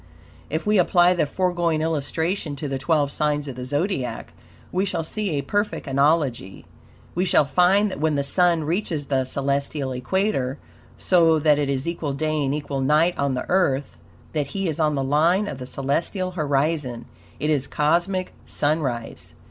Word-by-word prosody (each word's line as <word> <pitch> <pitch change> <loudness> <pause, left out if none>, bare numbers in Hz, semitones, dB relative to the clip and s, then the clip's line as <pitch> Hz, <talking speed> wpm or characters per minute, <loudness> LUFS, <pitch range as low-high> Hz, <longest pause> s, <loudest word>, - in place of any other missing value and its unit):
If 160 +2 -2
we 210 -1 +3
apply 175 0 +4
the 170 -4 0
foregoing 175 -1 0
illustration 160 +1 -1
to 145 +2 -5
the 135 -1 -3
twelve 145 -1 +1
signs 150 -1 -1
of 135 - -6
the 125 0 -6
Zodiac, 145 - -2 0.4
we 185 +1 +1
shall 180 -4 -2
see 210 +5 -2
a 140 - -1
perfect 205 +9 -1
analogy. 140 - 0 0.5
We 180 - 0
shall 170 -5 +4
find 190 +7 +3
that - - -6
when 155 0 +1
the 140 - 0
Sun 170 +2 +2
reaches 160 -2 -2
the 135 -2 0
celestial 140 +1 -1
equator, 135 0 -1 0.4
so 165 -3 +4
that 150 -1 +3
it 145 -1 0
is 135 +2 -2
equal 165 -4 -2
day 155 +1 -1
and 135 +1 0
equal 145 -2 -3
night 155 +6 +3
on 140 -2 0
the 125 - -3
Earth, 145 - 0 0.3
that 150 -3 -1
he 195 -1 0
is 160 -2 -3
on 155 -2 +2
the 135 - -1
line 165 +9 +2
of 140 - -5
the 125 - -7
celestial 165 +8 -1
horizon; 145 -6 -1 0.3
it 150 - 0
is 140 -3 0
cosmic 175 +5 0
sunrise. 120 - -2
150 Hz, 170 wpm, -23 LUFS, 140-175 Hz, 0.5 s, apply